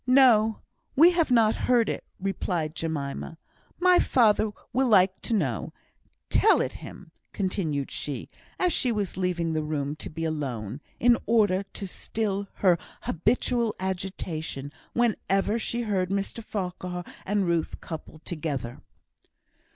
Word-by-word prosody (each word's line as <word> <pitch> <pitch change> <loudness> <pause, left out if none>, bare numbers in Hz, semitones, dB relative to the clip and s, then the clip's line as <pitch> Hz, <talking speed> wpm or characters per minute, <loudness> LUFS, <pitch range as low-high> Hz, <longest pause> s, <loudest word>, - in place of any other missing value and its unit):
"No! 235 -5 +5 0.3
we 330 +6 +8
have 340 -4 +2
not 225 -3 +5
heard 240 -3 +2
of - - +1
it," - - -8 0.2
replied 180 -5 -2
Jemima. 160 -1 -4 0.4
"My 360 0 +6
father 220 -3 +4 0.2
will 260 +2 +3
like 190 -4 +4
to - - -3
know; 135 - -1 0.6
tell - - +5
it - - 0
him;" - - -11 0.2
continued 165 -8 -1
she, 145 -2 -4 0.3
as 360 -2 +2
she 250 - +2
was 205 -4 -2
leaving 175 -3 0
the 155 - 0
room, 150 -1 -2
to - - -6
be 165 +1 -5
alone, 135 -6 -3 0.2
in 240 0 +5
order 205 -5 +3
to 200 - -4
still 200 +1 -3
her 180 -4 +3 0.2
habitual 235 +5 +1
agitation 175 -6 -4 0.2
whenever 220 -2 +1
she 235 +1 -1
heard 190 -5 0
Mr 200 +3 -2
Farquhar 180 -3 -4 0.2
and 205 0 +1
Ruth 170 -2 -1
coupled 160 -1 -9
together. 145 -8 -4
190 Hz, 135 wpm, -27 LUFS, 160-225 Hz, 0.6 s, we